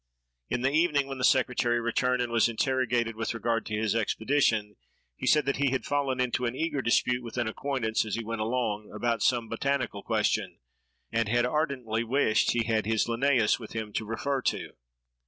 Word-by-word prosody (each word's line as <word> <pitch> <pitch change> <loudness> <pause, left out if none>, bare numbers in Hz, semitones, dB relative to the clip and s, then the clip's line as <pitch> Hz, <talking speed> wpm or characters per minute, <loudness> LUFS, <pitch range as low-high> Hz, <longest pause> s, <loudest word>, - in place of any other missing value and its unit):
In 120 - -1
the 135 - +2
evening, 150 -2 +2
when 135 -1 -6
the - - -3
secretary 125 -2 +2
returned, 125 +2 +1
and 120 - -4
was 115 0 +3
interrogated 120 -1 0
with 115 +1 -3
regard 115 0 -1
to 105 - -2
his 110 0 0
expedition, 110 -1 +1 0.4
he - - -5
said 150 -3 +4
that 140 - 0
he 140 0 +2
had 130 0 -2
fallen 140 -3 0
into 125 -1 0
an 120 - -3
eager 150 -2 -1
dispute 125 +1 +2
with 120 0 -8
an 120 -2 0
acquaintance, 110 -1 -1
as 110 -2 -3
he 115 - -3
went 115 0 -4
along, 110 -2 -2
about 115 +1 -1
some 120 -1 +2
botanical 135 -5 -2
question, - - 0 0.5
and 115 -1 0
had 120 +1 +2
ardently 125 -6 -1
wished 115 -2 +2
he 120 -1 +1
had 115 -1 +1
had 110 - -1
his 110 -1 +2
Linnæus 120 -1 +2
with 110 - -9
him 110 -2 -5
to - - -1
refer 130 +5 -2
to. - - -2
120 Hz, 195 wpm, -28 LUFS, 110-130 Hz, 0.5 s, said